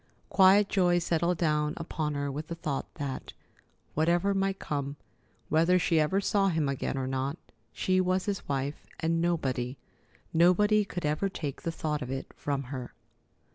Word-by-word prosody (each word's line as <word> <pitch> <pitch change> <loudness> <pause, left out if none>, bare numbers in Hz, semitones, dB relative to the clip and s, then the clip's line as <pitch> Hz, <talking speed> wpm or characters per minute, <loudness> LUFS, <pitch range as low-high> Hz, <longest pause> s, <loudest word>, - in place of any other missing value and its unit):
Quiet 195 +1 +6
joy 180 -3 +3
settled 170 0 +1
down 150 -2 +1
upon 155 -2 -3
her 140 0 -2
with 150 +3 -5
the 170 - -4
thought 150 -4 -3
that, 140 -2 -5 0.6
whatever 175 +5 +2
might 195 0 0
come, 140 -4 -3 0.5
whether 165 +4 +4
she 170 -2 +2
ever 155 +6 +2
saw 200 0 +2
him 160 -5 +1
again 140 0 -2
or 130 - -1
not, 135 +3 -2 0.3
she 185 0 +1
was 185 0 +1
his 200 -6 -3
wife, 140 +1 -2
and 165 +1 +1
nobody, 135 -7 -1 0.6
nobody 205 +6 +5
could 180 -4 -4
ever 150 +7 0
take 150 -7 -5
the 165 - -2
thought 150 -2 -2
of 125 - -5
it 135 0 -5
from 140 -1 -2
her. 130 -1 -7
160 Hz, 165 wpm, -29 LUFS, 140-180 Hz, 0.6 s, Quiet